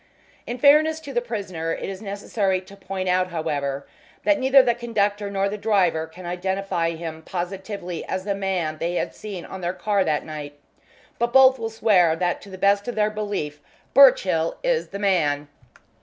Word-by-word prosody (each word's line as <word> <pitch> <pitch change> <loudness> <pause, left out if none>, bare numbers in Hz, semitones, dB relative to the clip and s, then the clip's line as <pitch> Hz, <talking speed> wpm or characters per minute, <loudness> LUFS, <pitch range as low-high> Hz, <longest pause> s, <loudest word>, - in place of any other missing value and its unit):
In 240 - -4
fairness 305 +4 +5
to 280 -3 -8
the 240 - +1
prisoner, 195 -9 -4
it - - -5
was 195 0 -6
necessary 200 -1 -1
to 190 +2 -14
point 190 -1 -5
out, 185 0 +2
however, 145 -5 -3 0.4
that 300 -1 +3
neither 265 0 +6
the 240 - +2
conductor 210 -4 -1
nor 195 0 0
the 210 +1 -4
driver 180 -7 +1
can 175 +3 -12
identify 180 -1 -2
him 160 -1 -6
positively 180 0 -5
as 190 0 -3
the 200 0 -1
man 185 -6 -2
they 170 +1 -2
had - - -2
seen 200 -5 -7
on 190 - -8
their 175 0 -2
car 200 +1 +1
that 155 -4 -1
night, 150 -2 -7 0.6
but 235 0 +1
both 265 0 +6
will 225 - -3
swear 190 -7 +3
that 175 +1 -1
to 200 - -12
the 190 - -9
best 200 +2 +2
of 245 - -3
their 215 0 +2
belief 205 -9 -4 0.3
Birchill 185 -11 +5
is - - +1
the 200 - -7
man. 155 -8 +1
195 Hz, 185 wpm, -23 LUFS, 170-215 Hz, 0.6 s, neither